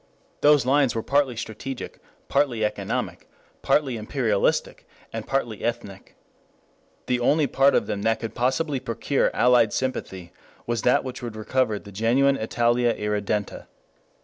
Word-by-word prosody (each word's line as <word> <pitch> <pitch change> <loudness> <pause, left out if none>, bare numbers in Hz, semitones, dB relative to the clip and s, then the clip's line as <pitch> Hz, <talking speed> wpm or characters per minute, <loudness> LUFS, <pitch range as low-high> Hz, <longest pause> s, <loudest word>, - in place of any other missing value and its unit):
Those 145 -4 +5
lines 135 -1 +3
were 115 - -2
partly 140 -3 +1
strategic, 120 +4 -6 0.3
partly 130 -6 +1
economic, 105 - -3 0.3
partly 135 -5 +1
imperialistic, 110 -2 -1 0.4
partly 120 -6 -2
ethnic. 115 -5 -5 0.9
The 125 -1 0
only 145 +5 +3
part 135 +1 +3
of - - +2
them 100 - -3
that 110 +1 +1
could 115 -2 -5
possibly 130 +4 0
procure 115 +4 0
allied 120 -3 +4
sympathy 95 -9 -4 0.3
was 120 -1 -1
that 125 - +3
which 130 0 -7
would 120 -3 -6
recover 110 0 0
the 100 - -12
genuine 120 +7 +2
Italia 120 +1 +1
Irredenta. 105 0 -2
120 Hz, 130 wpm, -24 LUFS, 110-135 Hz, 0.9 s, Those